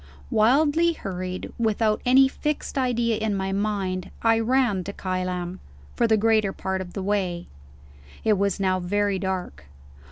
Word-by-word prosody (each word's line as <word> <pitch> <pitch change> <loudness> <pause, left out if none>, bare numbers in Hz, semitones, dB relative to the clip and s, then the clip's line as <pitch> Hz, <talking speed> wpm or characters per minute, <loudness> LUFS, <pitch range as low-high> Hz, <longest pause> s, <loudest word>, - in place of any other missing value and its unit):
Wildly 295 +9 +3
hurried 185 - -5
without 220 -1 +1
any 265 +2 +6
fixed 300 +2 -3
idea 240 -4 +1
in 215 -2 -1
my 190 0 -2
mind 195 -2 -2
I 225 0 +4
ran 230 -5 +1
to 200 - -5
Kylam, 185 -1 -3 0.4
for 235 - +2
the 220 -1 +4
greater 215 -2 +2
part 190 0 -3
of 180 -1 -8
the 195 - -4
way. 185 -4 -1 0.8
It 220 - +4
was 200 0 0
now 185 -1 +1
very 200 +2 0
dark. 190 - -4
205 Hz, 150 wpm, -24 LUFS, 185-225 Hz, 0.8 s, any